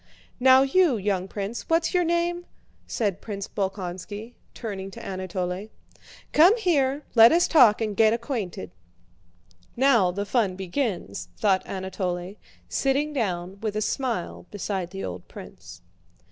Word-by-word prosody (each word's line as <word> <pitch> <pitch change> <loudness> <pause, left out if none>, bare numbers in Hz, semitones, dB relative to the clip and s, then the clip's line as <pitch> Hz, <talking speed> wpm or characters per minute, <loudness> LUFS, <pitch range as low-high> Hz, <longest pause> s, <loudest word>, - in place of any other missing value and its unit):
"Now 260 +1 +7
you, 285 -1 +3
young 195 -2 -1
prince, 205 +4 -5
what's 330 +2 +2
your 360 -1 +3
name?" 345 +1 -1 0.4
said 200 -5 -2
Prince 200 -2 -5
Bolkónski, 195 +3 -5 0.2
turning 195 -4 -5
to 195 - -10
Anatole, 185 +1 -4 0.6
"come 360 +9 +6
here, 295 - +1
let 230 0 +8
us 345 +1 +4
talk 235 -9 +6
and 215 -2 -1
get 220 +1 +5
acquainted." 220 - -4 1.0
"Now 235 -7 +4
the 200 +3 -3
fun 205 -4 +1
begins," 190 +2 -3
thought 195 -4 +2
Anatole, 185 -1 -4 0.3
sitting 280 +3 0
down 190 -6 -2
with 215 -2 -3
a 215 - 0
smile 200 - -3
beside 190 -3 -3
the 195 +1 -7
old 90 -1 -7
prince. - - -12
210 Hz, 130 wpm, -25 LUFS, 190-265 Hz, 1.0 s, let